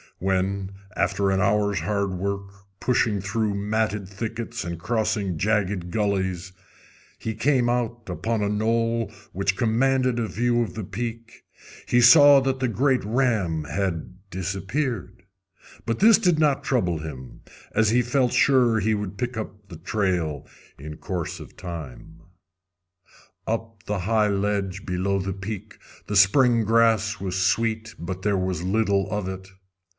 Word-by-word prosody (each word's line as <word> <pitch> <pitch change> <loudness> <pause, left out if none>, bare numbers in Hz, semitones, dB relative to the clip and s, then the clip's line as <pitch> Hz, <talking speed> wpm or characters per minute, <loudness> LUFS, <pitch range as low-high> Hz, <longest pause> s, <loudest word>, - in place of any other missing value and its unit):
When, 95 +1 -1 0.2
after 95 +2 +1
an 95 0 +1
hour's 100 0 +2
hard 100 +3 -1
work, 100 +2 -4 0.3
pushing 115 -5 +1
through 100 +1 -1
matted 105 -1 -1
thickets 115 +4 -5
and 85 -1 -5
crossing 100 -2 -1
jagged 100 -2 0
gullies, 95 -2 -1 0.6
he 110 - -4
came 120 +2 +2
out 120 -1 -2
upon 105 +5 -2
a 100 - 0
knoll 115 +2 0 0.2
which 95 +1 -1
commanded 125 +2 +2
a 115 - -1
view 120 +2 +1
of 115 - -3
the 110 - -4
peak, 115 +3 -6 0.4
he 120 - +4
saw 145 +3 +8
that 135 0 -1
the 130 - +1
great 130 +3 +1
ram 105 - 0
had 90 0 -3 0.2
disappeared. 95 - -3 0.6
But 115 -1 -1
this 220 +1 +7
did 180 -6 +3
not 150 -3 +2
trouble 90 - 0
him, 65 -5 -9 0.3
as 110 -1 +3
he 120 +2 +3
felt 125 0 +1
sure 125 -5 +4
he 110 +1 +1
would 100 -1 -5
pick 125 -1 -3
up 105 -2 -7
the 85 - -9
trail 85 -5 -1 0.3
in 75 +2 -8
course 90 -5 -4
of - - -12
time. 80 -2 -8 1.3
Up 115 0 -1
on - - -32
the 105 -1 -2
high 105 +3 +2
ledge 100 -1 -1
below 95 +2 0
the 95 +1 -3
peak 105 +2 -7 0.3
the 105 - -3
spring 115 +4 +5
grass 110 -1 +2
was 95 -1 -3
sweet, 110 +3 0
but 90 +2 -5
there 105 -2 +2
was 95 -2 -2
little 100 0 +1
of 105 -3 -2
it. 95 0 -6
105 Hz, 150 wpm, -24 LUFS, 95-115 Hz, 1.3 s, saw